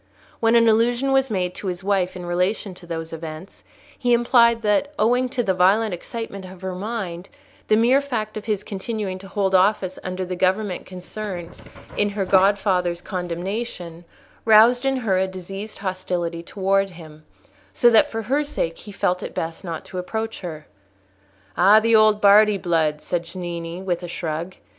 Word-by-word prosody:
When 225 0 +3
an 230 0 +5
allusion 240 +4 +2
was 270 0 +3
made 180 -4 -1
to 195 - -7
his 180 0 -4
wife 190 -2 0
in 180 -1 -7
relation 180 +3 -1
to 180 -1 -14
those 165 -1 -5
events, 160 +3 -8 0.4
he 245 -2 +2
implied 235 -1 +4
that, 215 +8 +1
owing 245 +4 +2
to 250 -1 -1
the 190 -4 +1
violent 195 +4 +3
excitement 200 +2 -6
of 185 0 -12
her 190 0 -3
mind, 190 -3 -5 0.4
the 215 - +4
mere 245 +5 +4
fact 225 -6 -4
of 215 - -6
his 210 -2 -1
continuing 200 -2 -4
to 195 - -11
hold 195 -1 -1
office 190 0 +2
under 185 0 -3
a 180 0 -4
government 190 +1 0
concerned 185 -1 -6 0.5
in 205 - +2
her 200 -1 -2
godfather's 190 -2 +2
condemnation, 180 -1 -5 0.4
roused 230 +4 +6
in 270 0 +1
her 205 -7 +1
a 190 - +1
diseased 195 +3 -7
hostility 180 -3 -3
towards 195 +1 0
him; 155 -2 -13 0.5
so 240 - +4
that 225 - +5
for 225 0 -4
her 275 +7 +1
sake 165 - -3
he 210 - -10
felt 180 -2 0
it - - -7
best 165 +3 -4
not 165 -3 -6
to 185 - -6
approach 220 +5 -4
her. 160 -4 -7 0.9
"Ah, 200 +4 +6
the 230 +1 +3
old 215 -1 +5
Bardi 210 0 +6
blood!" 160 -4 0
said 175 -1 -2
Cennini, 170 0 -6
with 175 -2 -1
a 175 - -6
shrug. 170 +1 -4
195 Hz, 175 wpm, -22 LUFS, 180-220 Hz, 0.9 s, roused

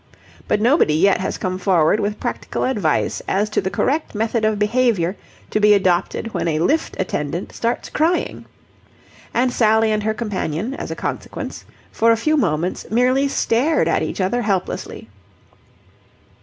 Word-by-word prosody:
But - - +1
nobody 230 - +3
yet 195 +5 +3
has 190 - -3
come 185 0 -3
forward 180 0 +3
with 210 +1 -2
practical - - -3
advice 205 - 0
as 210 +2 0
to - - +1
the 190 - -2
correct 280 - -1
method 225 +1 0
of 215 -1 +2
behaviour 210 -4 +1 0.4
to - - +1
be 210 0 +6
adopted 190 +3 0
when - - -1
a 155 -2 0
lift 290 - 0
attendant 170 -2 -3
starts 235 +1 -2
crying. 330 +4 0 0.9
And 250 +1 +1
Sally 220 -1 +3
and 215 0 0
her 220 +1 -1
companion, 210 - -3
as - - -6
a - - -4
consequence, - - -5 0.3
for 230 +1 +3
a 225 - +3
few 310 +7 +1
moments 175 - -1
merely 255 +4 +2
stared 275 +3 +1
at - - +1
each - - -3
other 195 +6 0
helplessly. 195 -5 -3
215 Hz, 155 wpm, -20 LUFS, 185-240 Hz, 0.9 s, be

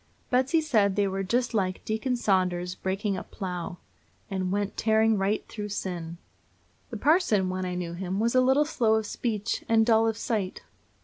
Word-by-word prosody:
Betsy 260 +6 +3
said 215 -11 +2
they 205 -1 +2
were 195 0 -2
just 235 +6 0
like 185 -3 -1
Deacon 225 +4 -1
Saunders's 180 -5 +1
breaking 195 +1 -2
up - - -8
plough, 180 -2 -5 0.5
"and 185 -1 -1
went 205 0 -1
tearing 220 0 +3
right 200 +1 0
through 210 -1 -6
sin." 175 -4 -4 0.7
The 235 - -5
parson, 240 - +3
when 185 0 -3
I 180 0 -3
knew 175 -1 -4
him, 185 +2 -3
was 230 +2 +1
a 255 - +5
little 265 +4 +4
slow 230 -7 +2
of 220 -1 0
speech 215 0 -2
and 225 -1 +4
dull 225 -1 +4
of 225 -1 -1
sight. 210 -5 -2
205 Hz, 180 wpm, -27 LUFS, 185-230 Hz, 0.7 s, a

